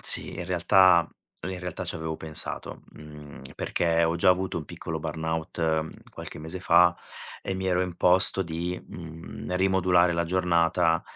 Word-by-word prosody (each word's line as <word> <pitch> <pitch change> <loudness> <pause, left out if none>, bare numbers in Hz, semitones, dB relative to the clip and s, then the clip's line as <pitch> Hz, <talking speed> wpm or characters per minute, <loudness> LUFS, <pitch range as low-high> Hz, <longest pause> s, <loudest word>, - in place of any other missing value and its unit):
Sì, - - +6
in 90 - -5
realtà 90 -1 +4 0.3
in 95 +2 -5
realtà 90 -2 -6
ci - - -2
avevo 80 0 -4
pensato, 80 -1 -2
mhmm, 75 -2 -12 0.2
perché 85 -1 0
ho 80 0 0
già 85 - +2
avuto 90 -1 +1
un 75 - -8
piccolo - - -6
burnout 80 0 -3
qualche - - -8
mese 80 +4 -6
fa 85 0 +4 0.5
e 95 - -4
mi 95 0 -4
ero 90 -1 +1
imposto 90 +1 +3
di, 85 +1 -4
mhmm, 85 +2 -8
rimodulare 90 -2 +3
la 85 0 -1
giornata, 85 -1 +1
85 Hz, 150 wpm, -26 LUFS, 80-90 Hz, 0.5 s, Sì